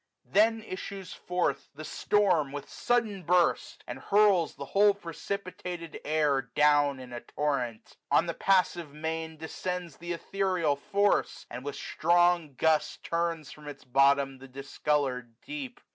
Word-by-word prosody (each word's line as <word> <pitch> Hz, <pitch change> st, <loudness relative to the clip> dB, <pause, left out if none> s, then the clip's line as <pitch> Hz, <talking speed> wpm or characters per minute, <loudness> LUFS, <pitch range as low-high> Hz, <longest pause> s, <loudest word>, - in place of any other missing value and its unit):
Then 225 Hz, +2 st, +3 dB
issues 190 Hz, -1 st, -7 dB
forth 180 Hz, -5 st, -2 dB
the 155 Hz, +2 st, -8 dB
storm 180 Hz, -10 st, +2 dB
with 145 Hz, 0 st, -6 dB
sudden 225 Hz, -5 st, 0 dB
burst, 175 Hz, +1 st, +1 dB
And -, -, -7 dB
hurls 200 Hz, -5 st, +3 dB
the 140 Hz, -, -7 dB
whole 200 Hz, +5 st, +4 dB
precipitated 180 Hz, -2 st, -6 dB
jur, 150 Hz, -3 st, +2 dB
Down, 145 Hz, -2 st, +4 dB
in 125 Hz, -1 st, -10 dB
a 120 Hz, -, -5 dB
torrent. 125 Hz, -7 st, -3 dB
On -, -, +4 dB
the -, -, -2 dB
passive 180 Hz, -5 st, +1 dB
main 160 Hz, +1 st, -3 dB
155 155 Hz, -, -19 dB
Descends 180 Hz, +2 st, -4 dB
th* 175 Hz, +1 st, -6 dB
ethereal 180 Hz, -3 st, 0 dB
force, 200 Hz, +8 st, 0 dB
and 125 Hz, +1 st, -6 dB
with 145 Hz, 0 st, -4 dB
strong 175 Hz, -3 st, +2 dB
gust 160 Hz, +2 st, +1 dB
Turns 170 Hz, -3 st, -2 dB
from 150 Hz, -1 st, -12 dB
its 145 Hz, -, -8 dB
bottom 135 Hz, +1 st, +3 dB
the 135 Hz, -, -11 dB
discoloured 135 Hz, -3 st, -2 dB
deep. 280 Hz, -4 st, -7 dB
160 Hz, 145 wpm, -29 LUFS, 140-185 Hz, -, whole